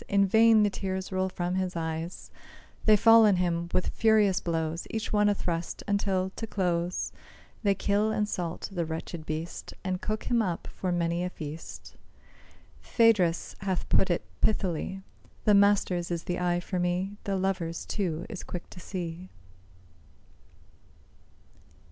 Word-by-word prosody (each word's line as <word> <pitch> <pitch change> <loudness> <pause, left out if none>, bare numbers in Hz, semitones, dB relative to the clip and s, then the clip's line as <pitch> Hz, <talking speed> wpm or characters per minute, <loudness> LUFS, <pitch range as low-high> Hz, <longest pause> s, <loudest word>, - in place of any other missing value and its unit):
In 200 -1 +4
vain 220 +2 +6
the 205 - +2
tears 190 -1 -4
roll 185 0 0
from 180 -1 -2
his 185 -1 -1
eyes; 165 +1 -4 0.5
They 215 - +7
fall 225 +1 +7
on 200 - +4
him 170 -1 0
with 185 - 0
furious 215 -4 +3
blows, 165 -1 -2
Each 220 -1 -3
one 210 0 +4
a 205 - +2
thrust, 170 -3 -3
until, 195 -2 0
to 225 - -4
close, 180 -3 -1 0.5
They 200 -2 +2
kill 205 +3 +1
and 210 -1 0
salt 175 -5 -3
the 175 -3 -1
wretched 160 0 -6
beast, 160 +2 -5
And 185 -1 -2
cook 215 0 -2
him 240 -2 +2
up 180 -6 -2
for 185 - -2
many 170 0 0
a 180 - -1
feast. 155 -2 -8 0.9
Phædrus 205 -8 +3
hath 190 -2 -2
put 190 - +3
it 175 - 0 0.2
pithily, 190 -1 0 0.4
The 210 - +5
master's 200 -3 +3
is 170 -1 -2
the 175 0 -2
eye 175 -1 +1
for 180 0 -3
me, 180 +3 -1
The 200 - 0
lover's, 185 -3 -2
too, 175 -5 -2
is 210 -5 -6
quick 175 - -7
to - - -10
see. 180 0 -6
185 Hz, 155 wpm, -28 LUFS, 170-200 Hz, 0.9 s, They